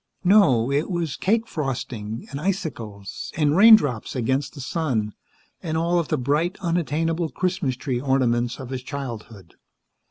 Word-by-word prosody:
No, 160 - +4
it 145 +6 0
was 170 -5 -2
cake 225 +4 +1
frosting, 120 - -4
and 140 +1 -5
icicles, 120 - -4
and 150 -1 +2
raindrops 185 - +5
against 130 +4 -1
the - - -9
sun, 130 - -2 0.5
and 160 -2 -2
all 170 +2 +2
of 165 - -2
the - - 0
bright, 150 +8 0
unattainable 165 -1 -1
Christmas 175 -3 -1
tree 125 -1 -3
ornaments 125 -3 +1
of 130 -1 -8
his 130 -1 -3
childhood. 115 - -8
140 Hz, 140 wpm, -23 LUFS, 120-170 Hz, 0.5 s, raindrops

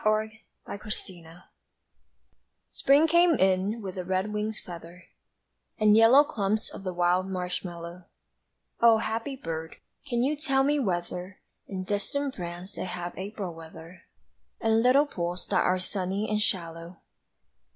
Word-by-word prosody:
Spring 215 0 +1 0.5
Came 190 -5 -6
In 165 +2 -15 1.3
SPRING 285 +4 +4
came 340 0 +5
in 195 +2 +1
with 190 -1 -5
a - - -2
red 190 +3 -1
wing's 215 +1 -2
feather 175 +1 -10 0.7
And 215 -1 +5
yellow 230 +6 +8
clumps 215 -4 -1
of - - -9
the 185 - -2
wild 180 +1 +2
marshmallow 180 -1 -5 0.7
O 230 -1 +7
happy 230 +4 -3
bird, 160 -8 -5 0.3
can 240 -1 +1
you 290 +4 +1
tell 270 -3 +1
me 290 +2 +2
whether 180 -3 -3 0.3
In 190 -2 -4
distant 260 +9 -1
France 175 0 -6
they - - -4
have 175 -1 -5
April 195 -2 -5
weather? 165 +2 -12 0.6
And 225 0 +3
little 260 +4 +5
pools 175 -9 -4
that - - +3
are 185 - +2
sunny 190 +2 -2
and 215 0 0
shallow? 170 -2 -3
195 Hz, 140 wpm, -28 LUFS, 175-225 Hz, 1.3 s, yellow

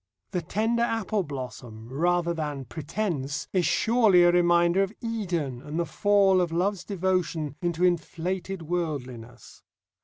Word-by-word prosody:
The 180 - -1
tender 220 +7 0
apple 225 -3 0
blossom, 125 -7 -7
rather 170 +6 +1
than 150 -4 -4
Pretence, 145 - -3
is 180 -3 +2
surely 220 -6 +4
a 175 - +6
reminder 175 +1 +4
of 195 0 0
Eden 175 - -3
and 150 +4 -5
the 170 - +1
fall 200 -1 +3
of 175 -2 -1
love's 180 +2 0
devotion 175 -6 -1
into 175 0 -1
inflated 180 +1 -2
worldliness. 130 -9 -5
175 Hz, 130 wpm, -26 LUFS, 150-190 Hz, -, a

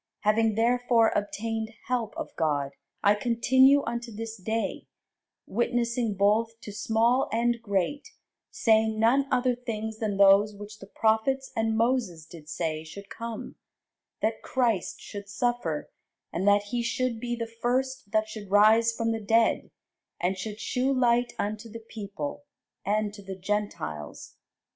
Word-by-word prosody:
Having 220 +1 +2
therefore 235 0 +3
obtained 220 +2 -3
help 245 -4 -2
of - - -6
God, 145 -3 0 0.3
I 205 - +6
continue 260 +5 +4
unto 235 0 -4
this 225 +1 -6
day, 220 +3 -3 0.6
witnessing 235 0 0
both 220 +4 +2
to 210 - -8
small 230 +5 +2
and 235 +1 +1
great, 205 - -1 0.4
saying 220 -1 +2
none 260 +5 +3
other 255 0 +2
things 220 -3 -5
than 210 -3 -1
those 200 +1 +6
which 205 +1 -10
the 195 - -11
prophets 225 +6 +1
and 225 -1 +1
Moses 225 -9 0
did 160 -2 -13
say 155 -1 -2
should 200 +6 -11
come: 230 -1 -6 0.7
that 220 +1 0
Christ 235 -8 0
should 200 -1 -8
suffer, 205 -8 -2 0.4
and 185 +4 -1
that 205 0 +5
he 240 -1 0
should 235 0 -1
be 240 0 -2
the 230 -1 -5
first 260 -2 -1
that 215 0 +2
should 215 -2 -8
rise 215 +3 +5
from 230 0 -1
the 225 -1 -2
dead, 225 +2 +2 0.5
and 180 +2 0
should 210 +3 -6
shew 255 +3 0
light 245 -2 +2
unto 215 +2 -3
the 225 +1 -10
people, 230 +8 -6 0.4
and 210 0 0
to 205 - -10
the 195 -1 -7
Gentiles. 185 - -4
220 Hz, 145 wpm, -27 LUFS, 205-235 Hz, 0.7 s, I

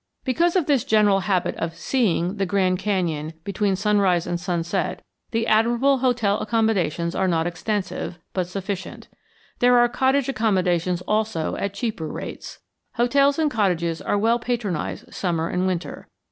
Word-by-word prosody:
Because 335 +7 +1
of 360 -5 +2
this 280 -5 +2
general 210 -2 +3
habit 190 -2 0
of 165 0 -3
"seeing" 195 -7 0
the 195 - 0
Grand 185 -1 +1
Canyon 165 -7 -1
between 200 +1 0
sunrise 195 -3 +2
and 175 - -2
sunset, 170 -1 -2 0.3
the 225 0 -1
admirable 235 +5 +3
hotel 240 -5 +1
accommodations 190 -7 0
are 190 - 0
not 165 -2 +1
extensive, 185 +1 -3 0.2
but 185 -2 -1
sufficient. 190 +1 -6 0.5
There 245 0 +5
are 240 0 +5
cottage 265 +2 +1
accommodations 180 -7 0
also 210 -6 -1
at 200 0 -3
cheaper 205 -7 -3
rates. - - -7 0.4
Hotels 275 +4 +3
and 310 -2 +1
cottages 170 - 0
are - - 0
well 230 +3 +2
patronized 230 -8 -3
summer 165 -3 -1
and 180 +1 0
winter. 180 -2 -4
200 Hz, 145 wpm, -23 LUFS, 175-230 Hz, 0.5 s, There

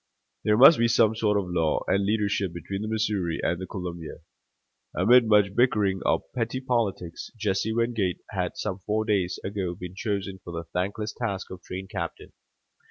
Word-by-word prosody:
There 105 0 +3
must 140 +5 +9
be 115 - +4
some 110 -1 +4
sort 105 -2 +2
of 100 - 0
law 80 -3 +1
and 100 +1 +2
leadership 100 -3 0
between 95 +4 -5
the 110 - -3
Missouri 105 -6 -1
and 90 +1 0
the 95 - -5
Columbia. 85 -4 -6 0.8
Amid 115 +5 +5
much 105 -2 +4
bickering 105 -6 +2
of - - +2
petty 120 +1 -2
politics, 115 -9 -2
Jesse 105 0 0
Wingate 115 -5 0
had 90 -4 -2
some 95 -2 -3
four 110 +3 -1
days 100 -5 0
ago 95 -3 -3
been 90 0 -8
chosen 100 -1 -3
for 85 - -8
the 85 0 -4
thankless 100 +4 -2
task 100 -7 -4
of 90 -1 -8
train 95 +1 -7
captain. 95 -4 -6
100 Hz, 170 wpm, -26 LUFS, 90-110 Hz, 0.8 s, must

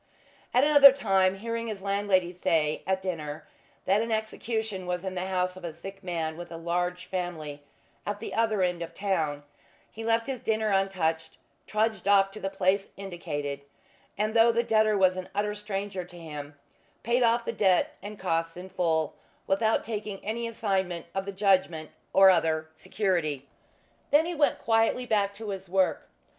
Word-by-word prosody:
At 250 - +4
another 290 -2 +9
time, 195 -7 +2
hearing 230 +3 -4
his 205 -3 -5
landlady 195 -3 +1
say, 160 -4 0
at 190 0 0
dinner, 155 -4 -4 0.4
that 195 +3 +3
an 230 0 -3
execution 220 -3 -2
was 180 0 -2
in 190 -1 -3
the 185 0 -3
house 185 -1 -1
of 185 - -12
a 170 - -4
sick 195 +5 -10
man 165 -3 -3
with 175 -1 -8
a 165 - -6
large 175 +2 -2
family, 160 -6 -4 0.4
at 205 0 -3
the 225 - -6
other 220 -4 +2
end 180 -1 0
of 170 0 -6
the - - -27
town, 160 -8 -1 0.5
he 225 - -8
left 230 0 +2
his 265 -1 -4
dinner 220 -1 0
untouched, 185 -5 0 0.3
trudged 215 -3 0
off 195 -1 +5
to 215 - -9
the 195 - -2
place 195 +1 +1
indicated, 145 -7 -5 0.6
and 215 +1 0
though 230 0 +6
the 235 +1 +1
debtor 215 -2 +3
was 185 -1 +3
an 185 - -6
utter 210 +1 0
stranger 205 -2 -4
to 175 0 -14
him 150 -3 -8 0.5
paid 240 +2 +2
off 235 0 +3
the - - -2
debt 190 -5 +2
and 205 +2 -8
costs 165 -2 -1
in 185 +1 -8
full, 165 -4 0 0.3
without 220 +3 +2
taking 210 -2 -4
any 230 +2 -2
assignment 190 -6 -1
of 195 0 -2
the 200 - -4
judgment 185 -5 +1 0.2
or 195 0 +8
other 160 -3 +1
security. 160 -9 -1 0.6
Then 300 +3 +5
he 350 - -3
went 300 -3 +2
quietly 225 +2 +2
back 200 -3 +1
to 215 0 -7
his 190 -2 -6
work. 190 0 +1
195 Hz, 175 wpm, -28 LUFS, 175-215 Hz, 0.6 s, another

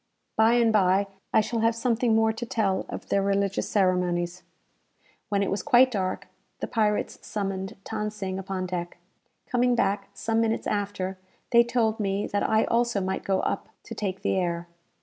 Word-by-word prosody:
By 220 +1 +5
and 235 -2 +4
bye, 195 -1 +4 0.3
I - - +5
shall 225 +2 -2
have 225 0 +2
something 230 -1 +1
more 220 0 +3
to 225 - -6
tell 210 -5 0
of - - -7
their 200 - +2
religious 200 0 0
ceremonies. 180 -2 +1 0.9
When 200 -1 +1
it - - -1
was 195 - -1
quite 260 -2 +5
dark, 185 -4 -2 0.3
the - - -2
pirates 215 -2 0
summoned 195 -2 -4
Than 210 -1 -2
Sing 190 -3 -4
upon 190 -1 -3
deck. 175 -1 -4 0.5
Coming 245 0 +2
back 200 -3 0
some 225 +2 -1
few - - +4
minutes 225 - -2
after, 195 -2 -2 0.3
they 235 0 +7
told 235 -2 0
me 200 -1 0
that 205 - -1
I 220 0 +3
also 235 -2 +1
might 190 0 -2
go 190 -1 +1
up - - -2
to - - -8
take 195 -2 -4
the - - +1
air. 170 -2 -1
205 Hz, 180 wpm, -26 LUFS, 190-225 Hz, 0.9 s, they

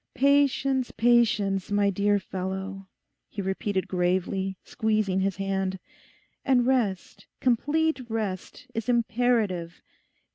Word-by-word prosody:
'Patience, 275 -1 +2
patience, 215 -5 +2
my 205 -1 +2
dear 205 +2 +2
fellow,' 190 0 -5 0.4
he 215 - -8
repeated 190 0 -2
gravely, 185 +1 -1
squeezing 215 -3 0
his 195 0 0
hand. 195 -1 -2 0.7
'And 255 -3 +3
rest, 230 -8 -1
complete 285 +2 +1
rest, 210 -5 -4
is 225 +2 -3
imperative. 225 -8 0
205 Hz, 100 wpm, -26 LUFS, 190-240 Hz, 0.7 s, And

